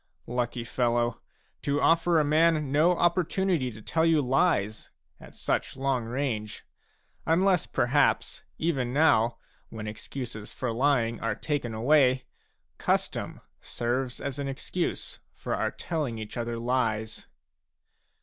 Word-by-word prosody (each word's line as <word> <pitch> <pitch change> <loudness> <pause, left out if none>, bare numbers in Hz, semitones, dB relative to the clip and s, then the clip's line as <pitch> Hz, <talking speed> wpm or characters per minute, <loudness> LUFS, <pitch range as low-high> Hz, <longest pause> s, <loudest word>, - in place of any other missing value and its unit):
Lucky 120 0 -2
fellow, 120 0 0 0.4
to 145 0 0
offer 165 +1 +4
a - - +3
man 155 -1 +3
no 165 +5 +4
opportunity 175 -4 +1
to 110 -2 -11
tell 160 +8 +1
you 165 -2 +4
lies 125 - +1 0.3
at - - -14
such - - -2
long 135 -3 0
range! 115 -4 -3 0.6
Unless 180 +1 +3
perhaps, 140 +4 +1 0.2
even 135 -7 -1
now, 120 -6 +4 0.3
when 110 -1 -7
excuses 110 0 -7
for 125 -2 -2
lying 120 -2 +1
are 115 -2 -1
taken 135 -6 -2
away, 130 +1 +3 0.5
custom - - -1 0.2
serves 125 +1 -2
as 140 -1 -4
an 140 - -2
excuse 140 +6 -3 0.2
for - - -4
our - - 0
telling 150 -9 -3
each 110 -1 -7
other 120 -1 -3
lies 115 -3 -1
130 Hz, 125 wpm, -28 LUFS, 115-155 Hz, 0.6 s, offer